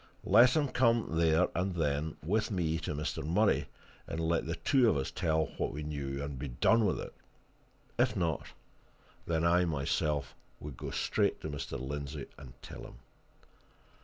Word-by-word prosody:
Let 125 +1 +6
him 150 -2 +2
come, 115 -9 +2
there 80 +2 +4
and 90 +1 -1
then, 75 -1 -1
with 105 +5 +1
me 85 -5 0
to 75 - -4
Mr. 75 -1 -3
Murray, 80 -4 +2 0.4
and 80 - -4
let 80 -1 0
the 85 - -2
two 130 +2 +3
of 80 - +2
us 65 - -2
tell 80 -3 +1
what - - 0
we 75 +1 -5
knew 70 -2 -4
and 70 -2 -5
be 75 - -4
done 110 - +3
with 90 - 0
it: - - -7 0.9
if - - +3
not, 80 -3 -1 0.8
then 80 -1 +1
I 90 +1 +4
myself 75 -1 -1 0.3
would 75 -3 -7
go - - -6
straight - - 0
to 80 - -4
Mr. 70 -2 -5
Lindsey 70 +2 -5
and 65 -4 -12
tell - - -9
him. - - -10
80 Hz, 170 wpm, -32 LUFS, 70-90 Hz, 0.9 s, Let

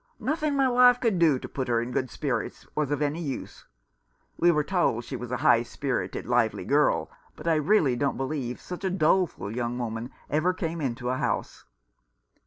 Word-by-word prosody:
Nothing 305 -1 -1
my 270 -1 +3
wife 250 0 +6
could 225 -8 +1
do 160 -5 +4
to - - -7
put 130 -1 -4
her 120 -1 +2
in 120 +2 -3
good 130 0 -1
spirits - - -3
was 150 -2 -1
of 145 0 0
any 150 +4 -1
use. 140 -5 -6 0.7
We 175 - +3
were 150 -3 +3
told 170 -9 +1
she - - -5
was 125 - -6
a 125 - 0
high 115 - +6
spirited, 125 +3 -3
lively 120 -2 +1
girl; 145 +2 +2 0.2
but - - -9
I 165 - +4
really 155 -3 +3
don't 140 +2 -1
believe 135 -3 -3
such 180 +2 -8
a 190 - +1
doleful 165 - +1
young 120 0 -2
woman 115 0 -4 0.2
ever 170 +5 +1
came 165 -2 -3
into 125 -2 -2
a 130 - 0
house." - - -3
145 Hz, 195 wpm, -27 LUFS, 125-175 Hz, 0.7 s, wife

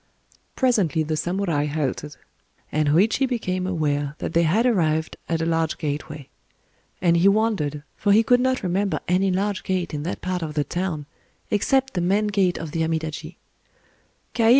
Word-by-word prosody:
Presently 200 - +2
the 155 +1 -2
samurai 175 -3 0
halted; 145 -1 -3 0.5
and 155 -1 +1
Hōïchi 220 - +3
became 185 -7 -2
aware 145 -5 -1
that - - -4
they 170 - +4
had 180 +9 +2
arrived 160 -9 +1
at 165 -1 0
a - - 0
large 165 -1 0
gateway;—and 155 +3 -4
he 175 +3 +4
wondered, 200 -9 +1
for 205 - +1
he 215 +3 +6
could 245 +2 +4
not 260 -1 +1
remember 190 +2 0
any 185 +2 +2
large 195 +1 0
gate 180 -3 -2
in 150 - -2
that 170 +5 -4
part 185 -1 -2
of 155 -2 -5
the 150 - +2
town, 170 -1 -3 0.5
except 265 +6 +2
the 180 - -1
main 195 +5 +2
gate 195 -3 +1
of 160 -2 -6
the 165 - -2
Amidaji. 160 0 -3
175 Hz, 160 wpm, -23 LUFS, 155-200 Hz, 0.5 s, he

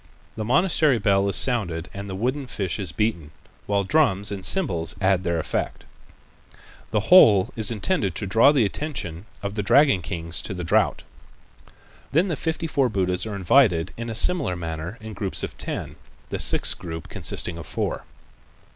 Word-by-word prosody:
The 110 - -4
monastery 150 - +2
bell 100 -2 +2
is - - 0
sounded 90 -10 +2
and 100 0 -7
the 95 - -5
wooden 130 +7 -2
fish 100 -4 -3
is 95 -5 -4
beaten, 85 -3 -2 0.4
while 100 -1 +1
drums 100 -6 +2
and 100 -2 -5
cymbals 90 - 0
add 95 -1 +2
their 85 -2 -1
effect. 80 - -3 1.0
The 105 - 0
whole 110 - +7
is 110 -2 +3
intended 115 - -1
to 105 - -2
draw 115 +8 +5
the 135 -7 +2
attention 100 - -5 0.2
of 100 0 -3
the 105 - -2
dragon 135 0 +4
kings 85 -2 -4
to 95 - -6
the 90 - -5
drought. 80 - +1 1.1
Then 170 +7 +2
the 165 - -1
fifty 160 +2 -3
four 140 -5 +1
Buddhas 90 -1 -1
are 105 - -5
invited 95 -3 +3
in 115 0 -6
a 115 - -4
similar 140 - +2
manner 85 +4 -6
in 110 0 -8
groups 95 -1 -3
of - - -5
ten, - - -5 0.3
the - - -4
sixth - - +2
group 80 -3 -7
consisting 85 -1 -3
of 80 - -9
four. - - -3
100 Hz, 175 wpm, -23 LUFS, 90-125 Hz, 1.1 s, whole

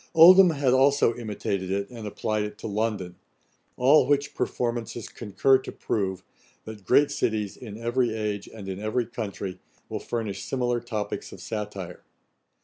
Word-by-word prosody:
Oldham 180 +3 +9
had 140 -5 +2
also 135 -2 +4
imitated 100 -5 -3
it, 100 +2 -2
and 115 -3 -7
applied 110 +1 -2
it 105 0 -6
to - - -10
London; 105 -4 -2 0.6
all 130 +2 +5
which 145 0 +1
performances 120 -2 -2
concur 120 +5 +2
to - - -8
prove, 95 -3 -2 0.4
that 110 -3 -9
great 145 0 +5
cities, 110 -8 -1
in 110 -4 -9
every 120 +1 0
age, 105 -2 -3
and 105 -3 -9
in 95 0 -4
every 110 +3 -1
country, 100 -5 -5 0.3
will - - -3
furnish 105 -5 -4
similar 125 -2 -1
topicks 110 -3 -4
of - - -10
satire. 100 -5 -6
110 Hz, 150 wpm, -26 LUFS, 100-125 Hz, 0.6 s, Oldham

